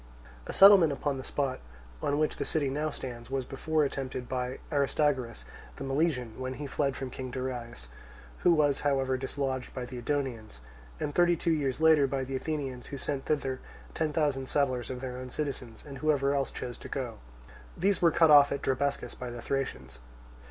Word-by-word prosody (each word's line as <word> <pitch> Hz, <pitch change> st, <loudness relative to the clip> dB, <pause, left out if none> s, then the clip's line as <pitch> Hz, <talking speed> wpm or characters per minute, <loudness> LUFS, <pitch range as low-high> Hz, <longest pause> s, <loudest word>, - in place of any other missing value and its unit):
A -, -, -3 dB
settlement 195 Hz, -5 st, +8 dB
upon 140 Hz, -1 st, -2 dB
the -, -, -6 dB
spot 135 Hz, -2 st, -2 dB, 0.4 s
on 145 Hz, -, +1 dB
which 155 Hz, 0 st, +1 dB
the -, -, -1 dB
city 145 Hz, -4 st, 0 dB
now 150 Hz, +3 st, -1 dB
stands 120 Hz, -4 st, -7 dB
was 135 Hz, -1 st, -1 dB
before 155 Hz, +4 st, 0 dB
attempted 130 Hz, -2 st, -4 dB
by 125 Hz, 0 st, -2 dB
Aristagoras, 140 Hz, -4 st, +1 dB, 0.3 s
the -, -, -7 dB
Milesian 135 Hz, -5 st, 0 dB
(when 130 Hz, 0 st, -3 dB
he 145 Hz, +3 st, -5 dB
fled 140 Hz, 0 st, 0 dB
from 130 Hz, -2 st, -5 dB
King 130 Hz, 0 st, -6 dB
Darius), 125 Hz, -, -5 dB, 0.5 s
who 175 Hz, -, +4 dB
was 145 Hz, -4 st, +3 dB
however 135 Hz, -2 st, +1 dB
dislodged 130 Hz, 0 st, -3 dB
by 130 Hz, -1 st, -3 dB
the 125 Hz, 0 st, -7 dB
Edonians; 120 Hz, -, -2 dB, 0.4 s
and 145 Hz, -, -2 dB
thirty 175 Hz, +1 st, +4 dB
two 170 Hz, +1 st, 0 dB
years 140 Hz, -4 st, -1 dB
later 160 Hz, -3 st, +6 dB
by 135 Hz, 0 st, -1 dB
the 135 Hz, +1 st, -4 dB
Athenians, 135 Hz, -3 st, -3 dB
who 140 Hz, -, -6 dB
sent 135 Hz, 0 st, -3 dB
thither 135 Hz, -4 st, -1 dB, 0.3 s
ten 160 Hz, -2 st, 0 dB
thousand 145 Hz, -4 st, 0 dB
settlers 130 Hz, -4 st, 0 dB
of 125 Hz, -1 st, -5 dB
their 125 Hz, -1 st, -5 dB
own 130 Hz, 0 st, -7 dB
citizens, 125 Hz, -5 st, -5 dB
and 140 Hz, -2 st, -8 dB
whoever 140 Hz, -1 st, +2 dB
else 140 Hz, -1 st, 0 dB
chose 120 Hz, -2 st, -6 dB
to -, -, -9 dB
go. -, -, -4 dB, 0.6 s
These 195 Hz, 0 st, +2 dB
were 170 Hz, -, +6 dB
cut 160 Hz, -1 st, +5 dB
off 145 Hz, -1 st, +8 dB
at 140 Hz, -, -2 dB
Drabescus 140 Hz, +2 st, -1 dB
by 125 Hz, -, -6 dB
the 120 Hz, 0 st, -7 dB
Thracians. 90 Hz, -, -3 dB
135 Hz, 185 wpm, -30 LUFS, 130-145 Hz, 0.6 s, settlement